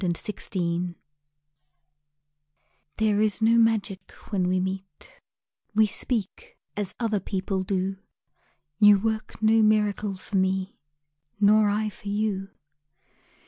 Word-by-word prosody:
AFTER 180 +4 -2 0.3
LOVE 175 0 -1 2.0
THERE 215 -1 +2
is 210 -3 +2
no 220 0 +3
magic 225 -5 +1 0.2
when 185 -3 +1
we 185 0 +1
meet, 190 -3 -6 0.5
We 220 0 +5
speak 245 - -3 0.2
as 205 -2 -3
other 220 -3 0
people 190 0 -2
do, 190 0 -2 0.8
You 205 -1 +7
work 220 +1 -3
no 220 +1 +5
miracle 210 -2 +1
for 195 +1 -4
me 190 0 -1 0.6
Nor 210 +1 +5
I 215 +1 0
for 205 +1 -13
you. 200 -2 -1
205 Hz, 110 wpm, -26 LUFS, 190-215 Hz, 2.0 s, You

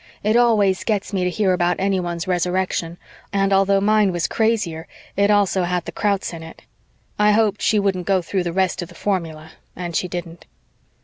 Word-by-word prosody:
It 215 +2 +2
always 215 -6 +3
gets 210 -2 -2
me 190 -2 0
to - - +1
hear 190 0 +1
about 175 0 +1
anyone's 185 -2 -1
Resurrection, 180 -1 -1 0.3
and 195 0 +1
although 195 0 +3
mine 210 0 +3
was 175 -1 -1
crazier, 205 -8 -1 0.3
it 200 +1 +2
also 200 -2 +3
had 175 -1 -1
the - - -6
Krauts 200 -3 -1
in 165 - -7
it. 160 0 -12 0.6
I 210 0 +5
hoped 210 -1 +1
she 215 - +2
wouldn't 195 -3 0
go 190 -2 +2
through 185 +1 -2
the 170 - -1
rest 185 0 0
of 175 - -7
the 175 - -15
formula 160 -6 -3 0.2
and 175 -2 -5
she 180 - 0
didn't. 175 -1 -7
190 Hz, 190 wpm, -21 LUFS, 175-200 Hz, 0.6 s, I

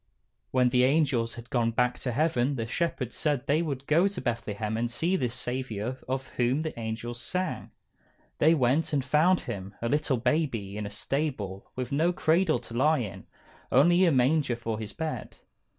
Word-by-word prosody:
_" - - -51 0.5
When 125 -1 +3
the 125 0 +3
angels 130 -5 +2
had 120 0 -11
gone 120 -2 +2
back 125 +2 +1
to 125 - -2
heaven 140 -1 +1
the 115 -3 -2
shepherds 130 -1 -2
said 145 -4 0
they 150 +4 +2
would 140 -5 -3
go 165 +7 +4
to 200 -2 -5
Bethlehem 110 -3 -2
and 120 +1 -1
see 165 +10 0
this 125 -9 -1
Saviour 125 -1 -4
of 130 +1 -3
whom 125 +5 0
the 160 - -3
angels 115 +2 -4
sang. 185 +7 -3 0.7
They 160 +2 +5
went, 140 +4 +1
and 140 -3 +1
found 160 +6 +3
Him, 100 -4 -6
a 115 - -2
little 145 0 +1
baby, 120 -6 0
in 105 -1 -3
a - - -6
stable, 105 -4 -3
with 125 -1 -4
no 160 +5 +2
cradle 165 0 +2
to - - -11
lie 150 +6 +3
in; 110 -8 -5 0.4
only 175 +7 +5
a 170 - +4
manger 135 0 +2
for 115 -2 -4
His 110 -1 -6
bed. 160 -1 -5
130 Hz, 185 wpm, -28 LUFS, 115-155 Hz, 0.7 s, They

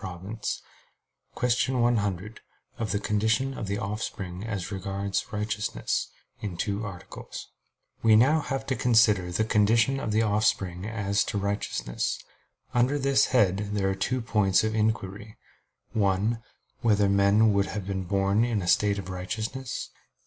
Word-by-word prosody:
_______________________ 95 +3 -5 0.7
QUESTION 125 +1 +1
100 105 -3 0 0.4
OF 110 -3 -1
THE 100 - 0
CONDITION 110 +6 +1
OF 105 - -5
THE 100 +1 -1
OFFSPRING 100 -3 -4
AS 100 -4 -4
REGARDS 100 0 -3
RIGHTEOUSNESS 105 0 -2 0.3
(In 100 -5 -4
Two 100 +3 -2
Articles) 90 -3 -9 0.5
We 110 -1 +6
now 135 +8 +5
have 135 -2 -3
to 130 - -1
consider 110 -7 +3
the 100 +5 +1
condition 115 +5 +3
of 110 - -2
the 110 +1 +3
offspring 100 -3 0
as 100 -2 0
to - - -3
righteousness. 100 -11 -2 0.6
Under 125 +4 +3
this 140 -1 +3
head 100 -7 +3 0.2
there 95 -2 +1
are - - -2
two 125 +6 -1
points 105 -4 +2
of 110 0 0
inquiry: 105 -1 -2 0.6
(1) 105 +2 +1 0.4
Whether 105 -4 +3
men 100 +2 +4
would 100 -1 +2
have 100 -2 -4
been 95 -1 -3
born 100 +3 +2
in 115 -5 0
a - - -5
state 100 +2 +3
of 95 - -5
righteousness? 110 +8 -4
105 Hz, 145 wpm, -27 LUFS, 100-115 Hz, 0.7 s, We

